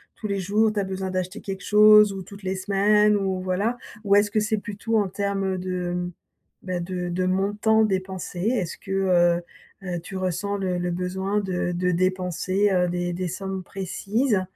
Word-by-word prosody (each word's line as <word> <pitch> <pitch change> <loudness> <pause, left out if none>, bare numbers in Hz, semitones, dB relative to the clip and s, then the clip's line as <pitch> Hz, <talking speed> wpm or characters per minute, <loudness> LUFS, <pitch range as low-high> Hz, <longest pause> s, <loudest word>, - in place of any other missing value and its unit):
tous 215 - -5
les 200 -1 -1
jours, 210 +4 +2
tu 210 - -2
as 200 - 0
besoin 190 0 -4
d'acheter 185 +3 -3
quelque 195 -3 -6
chose 210 -1 +7
ou 195 - -5
toutes 200 +1 -13
les 190 +1 -1
semaines, 205 +2 +3
ou 190 -2 -1
voilà? 200 +6 -1 0.3
Ou 200 0 +4
est-ce 205 0 +4
que 215 - +2
c'est 215 +1 0
plutôt 210 +2 -2
en 205 -3 +1
termes 195 -1 -1
de, 180 -1 -3 0.5
bah, 185 -1 -3
de 180 0 -4
de 180 +1 -1
montant 205 +4 +2
dépensé? 190 -3 -3
Est-ce 205 -4 -1
que, 195 - -10
heu 175 -3 +3 0.4
heu, 175 -2 -3
tu 190 +3 -9
ressens 185 +2 -2
le 185 -2 -1
le 175 0 -1
besoin 190 +3 -1
de 180 -2 -2
de 180 +1 0
dépenser, 185 +2 0
heu, 180 -1 +2
des 175 0 -2
des 180 +1 -2
sommes 190 +1 -4
précises? 200 +5 -1
190 Hz, 185 wpm, -24 LUFS, 180-205 Hz, 0.5 s, chose